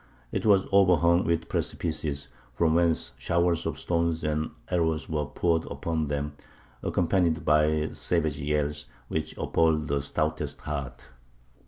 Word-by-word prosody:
It - - -1
was 100 -2 +5
overhung 90 -3 +4
with 85 0 0
precipices, 70 -2 -2 0.3
from 80 +1 +3
whence 85 -1 +2
showers 85 0 +1
of - - -3
stones 85 -1 0
and 75 +1 -1 0.2
arrows 80 -5 +1
were 75 -2 -1
poured 85 -2 0
upon 80 -2 -2
them, 75 0 -2 0.5
accompanied 85 -2 +1
by 75 0 +3
savage 80 -4 -1
yells, 75 0 -1 0.2
which 80 0 -3
appalled 80 -3 +1
the 70 0 +1
stoutest 75 0 -2
heart. 70 -4 -5
80 Hz, 130 wpm, -27 LUFS, 75-85 Hz, 0.5 s, was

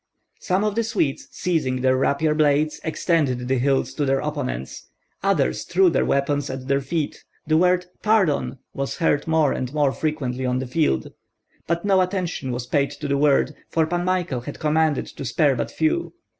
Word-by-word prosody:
Some 185 +2 0
of 210 -1 0
the 230 +2 0
Swedes, 155 -11 -1
seizing 135 -8 -1
their 130 0 +3
rapier 140 +4 +1
blades, 150 0 +2
extended 150 -7 0
the 130 0 +1
hilts 135 -1 +1
to 150 - -1
their 135 -1 +2
opponents; 140 - -4 0.3
others 65 - +1
threw 180 0 +3
their - - +1
weapons 140 +1 0
at 130 0 -6
their 140 0 +2
feet; 150 +2 -3 0.2
the 155 - +2
word 180 +2 +3 0.2
"Pardon!" 195 -11 +2 0.2
was 135 0 -3
heard 165 -3 +1
more 160 -3 +3
and 125 -1 -3
more 145 -2 +3
frequently 135 -5 -2
on 125 0 0
the 130 - -2
field. 125 - 0 0.6
But 170 +3 -1
no 195 -2 +4
attention 180 -7 -2
was 120 0 -3
paid 140 +2 +1
to 145 +1 -6
the 140 - +1
word, 145 0 +3 0.2
for 160 -1 +2
Pan 175 +2 -1
Michael 175 -8 -1
had 140 +4 -7
commanded 155 -1 +1
to - - -9
spare 140 +2 +2
but 120 - -2
few. 340 +2 -1
145 Hz, 185 wpm, -23 LUFS, 135-170 Hz, 0.6 s, no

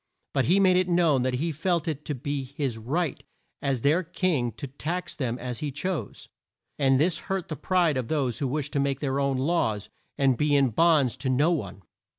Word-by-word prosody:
But 135 -3 +2
he 180 +8 +4
made 185 -2 +5
it 185 0 +1
known 170 -6 +3
that 130 0 0
he 160 +6 -1
felt 170 +2 -1
it 150 -2 -3
to 150 - -2
be 140 +2 -3
his 130 -3 -3
right 145 +7 -2 0.4
as 135 -4 0
their 155 +7 +3
king 165 -8 0
to 145 - -7
tax 155 +7 -4
them 125 -4 -2
as 125 -1 -5
he 150 -2 -3
chose, 165 +5 -4 0.5
and 135 -2 +4
this 165 +3 +2
hurt 195 -2 -2
the 155 - -3
pride 165 0 +1
of 125 -3 -2
those 135 -6 -1
who 140 - 0
wished 145 +2 -3
to 140 - +1
make 140 -1 0
their 135 -1 -1
own 140 -1 +1
laws, 130 - 0 0.3
and 135 -3 +3
be 150 -1 +3
in 135 -2 +4
bonds 145 -3 +3
to 130 0 -2
no 145 +6 +3
one. 100 - -3
145 Hz, 210 wpm, -26 LUFS, 130-165 Hz, 0.5 s, made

